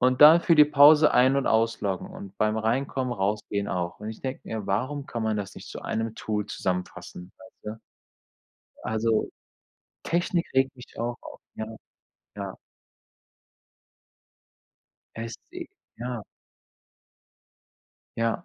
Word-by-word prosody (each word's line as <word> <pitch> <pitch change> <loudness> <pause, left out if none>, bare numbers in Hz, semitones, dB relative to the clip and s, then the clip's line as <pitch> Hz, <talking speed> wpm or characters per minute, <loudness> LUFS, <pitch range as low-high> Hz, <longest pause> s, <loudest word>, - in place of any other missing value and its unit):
Und 130 +1 +3
dann 160 +3 +10
für 170 - +5
die 150 - +9
Pause 150 +1 +7
ein 130 +2 +5
und 140 - 0
ausloggen 110 -4 +1
und 100 0 -10
beim 110 0 +2
Reinkommen, 125 +3 0
Rausgehen 100 0 -1
auch. 90 +1 -3
Und 105 +1 -5
ich 110 - -10
denke 130 0 -4
mir: 110 -3 -5
„Warum 130 +8 -1
kann 115 - -4
man 110 -1 0
das 100 -2 -5
nicht - - -10
zu - - -7
1 115 0 -2
zusammenfassen?" 90 -3 -4
Weißt 105 +3 -9
du? - - -24 1.0
Also, 110 0 0 0.7
Technik 175 0 0
regt 135 0 +2
mich 125 - -14
auch 120 +1 -2
auf, - - -11 0.2
ja. 110 - -4 0.7
Ja. - - -5 2.6
Echt, - - -6
i 355 -1 -6 0.3
ja. - - -4 1.9
Ja. 115 +8 0
115 Hz, 125 wpm, -26 LUFS, 105-135 Hz, 2.6 s, dann